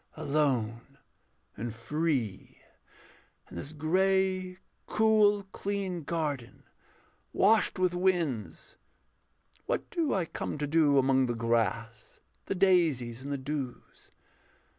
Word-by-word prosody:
Alone 135 -5 -1 0.6
and 115 +1 -5
free 125 - -2 0.9
In - - -10
this 110 - -5
grey, 185 +3 +1 0.3
cool, 215 -2 +3
clean 195 -3 -3
garden, 145 -8 -3 0.7
washed 215 +1 +3
with 185 -1 +1
winds, 175 - -1 0.9
What - - -1
do 325 -5 0
I 185 -4 +1
come 160 - -5
to 150 - -2
do 145 -1 +3
among 130 -1 +3
the 120 - -2
grass, 115 -1 -2 0.3
The - - -1
daisies, 160 -11 +2
and 140 +2 -6
the 140 - -1
dews? 135 -2 -6
150 Hz, 105 wpm, -29 LUFS, 125-185 Hz, 0.9 s, cool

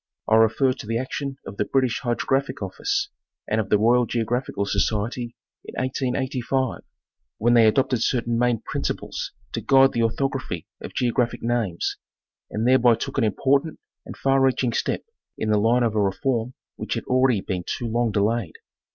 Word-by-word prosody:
I - - +2
refer 115 +4 +4
to 125 -4 -10
the 115 +1 0
action 135 +2 -4
of 100 - -8
the 105 - 0
British 130 -3 +1
Hydrographic 135 +2 -1
Office 405 0 -2 0.4
and 110 +1 +1
of 100 - -7
the 105 - +5
Royal 120 +3 +3
Geographical 115 -2 -1
Society 110 +4 -1 0.3
in - - -10
1885, 130 -1 -1 0.6
when 120 +2 +3
they 115 -2 +6
adopted 130 +1 +2
certain 120 -2 0
main 120 -2 +2
principles - - -4 0.2
to - - -2
guide 135 0 +5
the 115 - -1
orthography 130 - -1 0.2
of - - -8
geographic 120 -1 0
names, 115 -7 -1 0.5
and 110 +3 -1
thereby 125 -2 +5
took 135 - -3
an - - +2
important 140 +8 +1 0.2
and - - -10
far 135 0 +2
reaching 130 -2 +2
step - - -1 0.3
in 110 - -1
the 105 - +3
line 120 +3 +3
of 115 -2 +1
a 105 - +1
reform 115 +5 -1 0.2
which - - -3
had - - -3
already 130 -4 +2
been 90 -2 -3
too 120 - -4
long 115 0 0
delayed. 105 -3 0
120 Hz, 170 wpm, -24 LUFS, 110-130 Hz, 0.6 s, they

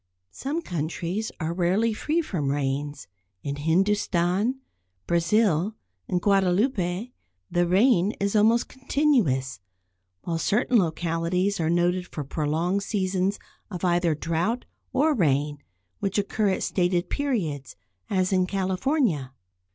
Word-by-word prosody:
Some 300 - -3
countries 175 +5 -3
are 160 0 -2
rarely 190 +6 +1
free 315 +9 0
from 155 - -2
rains; 145 -1 -2 0.4
in 140 0 -3
Hindustan, 190 - +1 0.5
Brazil 175 +2 +2 0.3
and 180 - 0
Guadeloupe 195 +2 +1 0.4
the 175 0 +2
rain 195 +1 +4
is 200 +1 0
almost 225 +3 +4
continuous, 235 - +1 0.6
while 165 -1 -2
certain 230 +6 +2
localities 175 +3 0
are 160 -1 +1
noted 175 +1 +1
for 150 - -5
prolonged 160 +7 -1
seasons 195 -1 0 0.3
of 185 -2 -4
either 175 -2 +2
drought 170 - -1 0.3
or 305 +3 +3
rain, 145 - +1 0.4
which 195 0 -1
occur 205 +1 +1
at 190 - -1
stated 180 -1 0
periods, 180 - -2 0.3
as 185 0 +1
in 185 -1 +2
California. 190 - 0
185 Hz, 115 wpm, -25 LUFS, 165-210 Hz, 0.6 s, rain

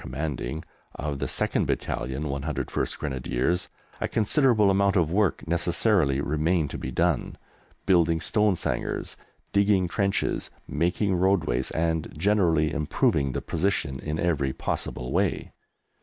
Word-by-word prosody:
C. - - -9 0.9
of 70 -1 -4
the - - -1
2/101 70 +3 -2
Grenadiers, 70 +6 -1 0.3
a - - +1
considerable 110 -2 +3
amount 100 +1 +2
of 85 -4 +2
work 100 -3 +1
necessarily 85 -3 +2
remained 75 +1 0
to - - -5
be 65 - -4
done, 85 +3 0 0.5
building 85 -3 +3
stone 105 +2 +2
sangars, - - -3 0.4
digging 100 -2 +3
trenches, 100 +3 -1 0.2
making 90 +5 0
roadways, 85 -9 +1
and 80 -1 -1
generally 85 -4 +2
improving 70 -2 +1
the - - -3
position 85 -6 -1
in 75 0 -3
every 70 -7 0
possible 60 +1 -3
way. - - 0
85 Hz, 115 wpm, -26 LUFS, 75-95 Hz, 0.9 s, considerable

